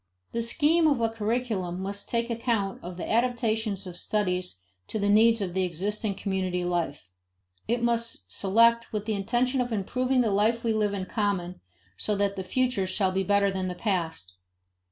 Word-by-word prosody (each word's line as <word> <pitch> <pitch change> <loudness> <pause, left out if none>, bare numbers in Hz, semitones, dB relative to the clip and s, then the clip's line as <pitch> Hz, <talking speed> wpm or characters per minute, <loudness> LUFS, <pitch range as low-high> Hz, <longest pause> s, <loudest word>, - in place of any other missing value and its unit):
The 230 - -1
scheme 305 +8 +3
of 280 -5 +2
a 230 -1 +2
curriculum 220 -5 -2
must 200 +1 -5
take 235 0 0
account 225 -4 -1
of 175 0 -7
the - - -5
adaptation 230 -2 +1
of 180 -2 -7
studies 180 - -2 0.3
to - - -3
the 205 -1 0
needs 225 +2 +5
of 185 -3 -2
the 190 0 +1
existing 200 +4 -1
community 185 -3 -2
life; 165 - -2 0.6
it 235 +1 0
must 230 - -1
select 230 - +3
with 210 -1 -3
the 220 - -1
intention 240 +6 +1
of 245 -1 -2
improving 250 +5 +1
the 225 -4 +1
life 220 +4 +2
we 230 -1 +1
live 210 -2 +1
in 190 -1 -3
common 185 -4 -2 0.4
so 210 - 0
that 200 0 0
the 190 - -4
future 235 0 0
shall 185 0 +1
be 190 +1 0
better 200 +1 +2
than 190 -1 -2
the 180 - -4
past. 165 - -2
205 Hz, 180 wpm, -27 LUFS, 185-230 Hz, 0.6 s, needs